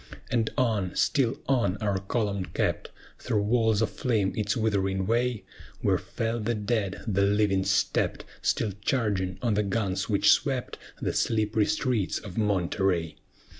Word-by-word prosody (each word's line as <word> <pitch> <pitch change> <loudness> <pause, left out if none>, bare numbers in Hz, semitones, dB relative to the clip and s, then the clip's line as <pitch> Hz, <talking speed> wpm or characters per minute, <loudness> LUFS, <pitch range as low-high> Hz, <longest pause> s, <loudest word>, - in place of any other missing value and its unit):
And 115 -3 +1
on 110 -7 0
still 125 -5 +2
on 115 -8 +2
our 100 -2 -1
column 100 -1 -1
kept - - -2 0.3
Through 105 -2 0
walls 110 -1 +2
of - - -1
flame 110 -6 0
its 105 +1 -1
withering 95 -4 0
way; 120 +1 0 0.4
Where - - +2
fell 115 +1 -3
the 115 +2 -1
dead, 105 -2 -2
the 100 -4 +1
living 100 -1 +2
stept, - - 0 0.2
Still 110 - 0
charging 100 -8 0
on 115 -3 +2
the 105 - +2
guns 100 -1 -1
which 105 0 +5
swept 135 -4 0 0.2
The - - -1
slippery 110 -1 +1
streets 115 -7 0
of 100 -3 -8
Monterey. 95 -5 0
105 Hz, 145 wpm, -27 LUFS, 100-115 Hz, 0.4 s, which